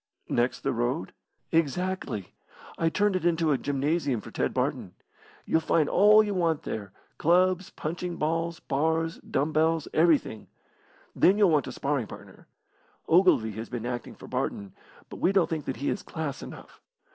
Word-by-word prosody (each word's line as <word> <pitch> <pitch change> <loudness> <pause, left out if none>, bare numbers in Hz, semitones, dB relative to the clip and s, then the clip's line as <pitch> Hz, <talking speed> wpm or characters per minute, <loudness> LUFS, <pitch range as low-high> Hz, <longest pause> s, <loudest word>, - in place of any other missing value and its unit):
"Next 120 +1 0
the - - -1
road?" - - -2 0.4
"Exactly. 165 - -1 0.4
I 165 - +1
turned 205 +3 +1
it 185 - -1
into 165 -2 +2
a 140 - +3
gymnasium 145 -2 0
for - - -11
Ted - - -1
Barton. - - -2 0.5
You'll 160 - +2
find 155 -1 +2
all 210 +5 +6
you 205 -1 -2
want 165 -5 0
there: 100 -3 -5 0.3
clubs, 180 +2 +3
punching 175 +2 -4
ball, 165 +2 -1
bars, 160 +3 0
dumb 145 +4 -2
bells, 160 0 +2
everything. 155 -9 +2 0.7
Then 195 +3 +4
you'll 200 -5 +5
want 150 -3 +2
a - - -5
sparring 140 -5 -2
partner. - - -13 0.6
Ogilvy 165 - +4
has 110 +2 -7
been 120 -2 -5
acting 120 0 -5
for - - -12
Barton, 100 -1 -3 0.3
but - - -9
we 185 - +2
don't 195 -3 +3
think 155 -3 -2
that 130 - -3
he 140 - -2
is - - -3
class 155 -4 -5
enough. - - -11
160 Hz, 165 wpm, -27 LUFS, 135-175 Hz, 0.7 s, all